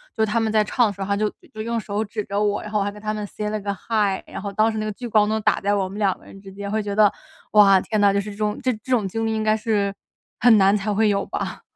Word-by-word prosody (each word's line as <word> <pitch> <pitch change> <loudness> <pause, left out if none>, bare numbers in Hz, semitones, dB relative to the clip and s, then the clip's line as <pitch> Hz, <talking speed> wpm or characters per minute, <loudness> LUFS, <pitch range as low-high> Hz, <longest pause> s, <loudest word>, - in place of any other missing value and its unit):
就 220 - +2
他 220 +2 0
们 225 -1 0
在 215 -1 +3
唱 230 +2 +2
的 200 - -3
时 195 - -10
候 195 - -2
他 200 0 0
就 210 0 +1 0.2
就 215 - -6
用 230 +1 -2
手 210 +1 -3
指 210 0 -4
着 200 +1 -2
我， 205 -1 0
然 210 - -8
后 210 - +1
我 - - +1
还 - - -1
跟 210 0 -13
他 215 0 -2
们 210 -1 -4
say 210 +1 -4
了 215 0 -2
个 200 0 -2
hi。 205 -1 -1
然 - - -7
后 200 -1 -5
当 220 +2 +3
时 220 - -5
那 215 - -2
个 215 - -2
聚 245 - -8
光 210 -2 +3
灯 220 0 0
打 - - +2
在 200 +1 +1
我 190 -2 -1
们 205 +2 -7
两 195 -3 +1
个 - - -21
人 195 - -13
之 195 -1 -12
间， 200 0 -6
会 220 0 0
觉 200 -1 -3
得： 210 -1 +5 0.4
“哇， 195 -3 +7
天 215 -2 -2
哪， 200 -1 +5
就 200 - +1
是 210 +1 -7
这 200 - -11
种 210 -1 -1
这 255 - +2
这 220 +4 -13
种 230 -6 +2
经 225 +4 -3
历 220 - 0
应 215 - -1
该 215 0 +2
是 205 -2 0 0.5
很 225 -2 +6
难 195 +1 +5
才 205 +1 -2
会 215 +1 +3
有 200 -1 0
吧！” - - -5
210 Hz, 370 characters per minute, -22 LUFS, 200-220 Hz, 0.5 s, 哇